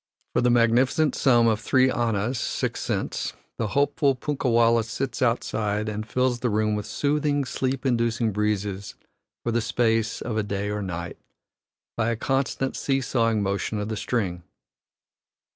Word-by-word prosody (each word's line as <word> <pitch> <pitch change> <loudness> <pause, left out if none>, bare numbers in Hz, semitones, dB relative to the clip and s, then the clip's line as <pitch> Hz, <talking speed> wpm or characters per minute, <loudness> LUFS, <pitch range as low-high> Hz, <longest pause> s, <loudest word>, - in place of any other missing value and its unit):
For - - +2
the 125 - +3
magnificent 120 +6 +3
sum 120 -3 +4
of 110 -2 +2
three 130 +3 +3
annas 115 +1 0
(six - - -2
cents) - - -2 0.3
the 115 - 0
hopeful 140 -1 +2
punkah 135 0 -2
wallah 115 0 +4
sits 130 +6 -4
outside 110 -3 0
and 110 0 -4
fills 125 +1 +1
the 125 - 0
room 105 0 +1
with 105 - -4
soothing, 145 -1 0
sleep 130 +1 -2
inducing 115 -2 +1
breezes 100 -1 -2 0.5
for 120 - +1
the 120 +1 +1
space 115 -1 +1
of 110 -2 -3
a - - +2
day 100 0 -3
or 105 0 -2
night, 85 -2 -5 0.8
by 115 0 0
a 115 - 0
constant 135 +2 -1
seesawing 120 -5 +1
motion 100 +2 -1
of 105 +1 -3
the 110 - -2
string. 100 -6 -2
115 Hz, 155 wpm, -25 LUFS, 105-130 Hz, 0.8 s, sum